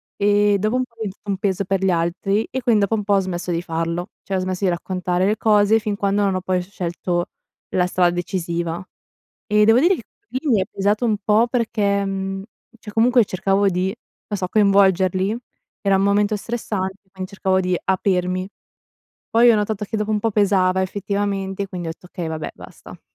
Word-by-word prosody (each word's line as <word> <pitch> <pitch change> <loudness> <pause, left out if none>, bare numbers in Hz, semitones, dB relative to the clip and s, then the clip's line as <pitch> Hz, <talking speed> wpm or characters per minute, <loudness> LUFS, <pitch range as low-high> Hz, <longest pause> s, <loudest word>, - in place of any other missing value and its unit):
e 205 0 +3
dopo 215 +4 0
un 255 - +2
po' 250 -2 -13
è - - -41
diventato 205 -2 -6
un 195 - -1
peso 195 0 0
per 195 0 -1
gli 190 - +3
altri 180 +5 0
e 260 - -2
quindi 230 -4 +3
dopo 200 +2 +1
un 210 - -2
po' 200 0 +2
ho - - +4
smesso 180 -1 -3
di 170 0 0
farlo, 165 +1 -3
cioè 195 -2 -2
ho - - 0
smesso 185 +1 -2
di - - +3
raccontare 180 +1 -1
le 210 +2 +1
cose, 215 0 +4
fin 210 -2 -2
quando 200 0 0
non 195 -2 +1
ho 185 - -1
poi 185 0 0
scelto 175 -1 -3 0.4
la 180 -1 +1
strada 180 -1 +2
decisiva 170 -1 -3 0.6
e, 210 0 +4
devo 225 +2 +6
dire 345 +8 +4
che - - -7 0.3
lì, 260 - -3
mi 220 -5 +4
è - - +1
pesato 205 +4 0
un 220 -3 +2
po' 215 +3 +4
perché 215 -5 0
mhmm, 195 0 -3 0.4
cioè 210 - -9
comunque 240 +2 +4
cercavo 195 +1 +1
di, 185 +1 -1 0.3
non 205 - -3
so, 185 -1 -2
coinvolgerli 195 -1 +3 0.5
era 195 -2 +3
un 190 - +2
momento 205 +1 +2
stressante, 200 -3 -4
quindi 190 0 -7
cercavo 190 -2 +1
di 185 -1 0
aprirmi. 185 -1 0 0.8
Poi 235 +1 +5
ho 230 - +6
notato 210 0 -1
che 220 - -3
dopo 210 0 -1
un 210 - +1
po' 225 - 0
pesava 195 -3 +2
effettivamente 200 0 -2
quindi 180 -3 -6
ho - - -2
detto: 165 - -15
"Okay, 180 -2 -5
vabbè 160 -1 -4
basta." - - -13
195 Hz, 200 wpm, -21 LUFS, 185-210 Hz, 0.8 s, devo